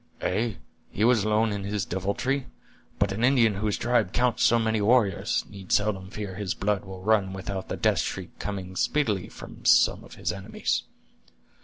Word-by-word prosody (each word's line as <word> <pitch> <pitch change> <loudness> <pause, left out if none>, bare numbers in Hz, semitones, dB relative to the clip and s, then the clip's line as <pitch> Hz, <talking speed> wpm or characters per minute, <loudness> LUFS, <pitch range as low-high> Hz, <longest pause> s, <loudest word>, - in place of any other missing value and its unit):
"Ay, 110 -3 0 0.3
he 105 - -2
was 115 -3 +4
alone 110 +1 +2
in 100 -1 -3
his 100 0 -2
deviltry! 120 +9 -1 0.5
but 100 -1 +1
an 105 +4 -2
Indian 120 -4 +4
whose 105 +1 -1
tribe 120 -5 +1
counts 125 -1 +1
so 120 - +5
many 110 -1 +1
warriors, 105 -4 +2
need 100 -2 -11
seldom 100 -3 +1
fear 100 -1 -6
his 95 -1 -3
blood 100 0 0
will 95 -1 -9
run 100 -3 +2
without 95 0 -5
the - - -3
death - - +2
shriek - - -4
coming 95 -3 -5
speedily 105 -7 0
from - - -11
some - - +4
of - - -13
his - - -2
enemies." 100 +3 -2
105 Hz, 175 wpm, -26 LUFS, 95-115 Hz, 0.5 s, so